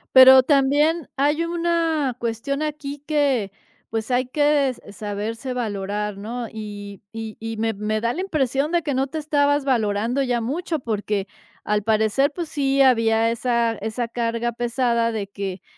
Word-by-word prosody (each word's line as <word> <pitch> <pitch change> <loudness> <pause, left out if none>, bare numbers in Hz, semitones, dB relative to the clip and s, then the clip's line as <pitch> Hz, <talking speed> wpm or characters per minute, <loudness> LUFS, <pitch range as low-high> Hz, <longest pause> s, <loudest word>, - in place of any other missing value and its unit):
Pero 260 0 +10
también 290 +4 +2
hay 295 +4 +2
una 335 -5 0
cuestión 235 +5 -2
aquí 290 -2 -4
que, 275 -9 +1 0.4
pues, 225 +2 -3
hay 250 +1 +1
que 290 0 +2
s 255 - -6
saberse 215 +5 -4
valorar, 210 -3 -3
¿no? 230 +4 -5
y 205 -2 -8
y 225 -1 -6
y 225 0 -5
me 225 +1 0
me 215 +1 -2
da 235 +2 0
la 355 - -3
impresión 295 -5 0
de 345 -1 +1
que 285 - -1
no 265 +1 0
te 315 - -6
estabas 290 -2 +1
valorando 230 0 +1
ya 250 -3 0
mucho 315 +8 -2
porque, 210 -4 -2 0.4
al 210 0 0
parecer, 220 +6 +2
pues, 340 +2 -5
sí 275 -1 +2
había 230 -3 +3
esa 235 -1 +1
esa 225 +2 -3
carga 235 0 -1
pesada 235 -1 0
de 215 -3 -3
que 195 -2 -5
245 Hz, 160 wpm, -22 LUFS, 220-285 Hz, 0.4 s, Pero